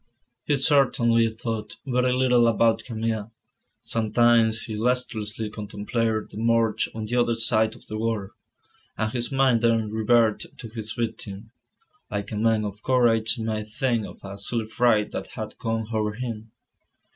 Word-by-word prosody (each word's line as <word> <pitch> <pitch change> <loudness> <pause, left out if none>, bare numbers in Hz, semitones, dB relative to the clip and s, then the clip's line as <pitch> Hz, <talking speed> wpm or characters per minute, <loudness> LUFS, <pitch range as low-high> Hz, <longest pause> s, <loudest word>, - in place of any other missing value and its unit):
He 145 - +2
certainly 125 -5 +3
thought 110 -1 -5
very 125 -1 +1
little 125 -2 +4
about 115 0 +3
Camille. 115 -2 -3 0.5
Sometimes 115 0 +3
he 110 - -5
listlessly 110 -2 -1
contemplated 110 +1 -2
the - - -10
Morgue 115 0 +2
on 110 -1 -4
the 120 +3 -3
other 120 -1 +2
side 110 -1 +1
of - - -16
the 110 0 -5
water, 110 -3 -2 0.7
and 110 0 -1
his 120 0 -2
mind 135 -4 +3
then 115 -2 +2
reverted 110 0 +1
to 115 - -8
his 110 -1 -5
victim, 110 -2 -5 0.6
like 105 -1 -4
a - - -3
man 110 0 +2
of 105 0 -6
courage 120 -2 +2
might 110 -1 -3
think 115 0 -1
of - - -12
a 100 0 -8
silly 115 +3 -2
fright 110 -2 +2
that - - -5
had - - -6
come 115 0 -2
over 105 -1 0
him. 115 -1 -6
115 Hz, 155 wpm, -25 LUFS, 110-120 Hz, 0.7 s, little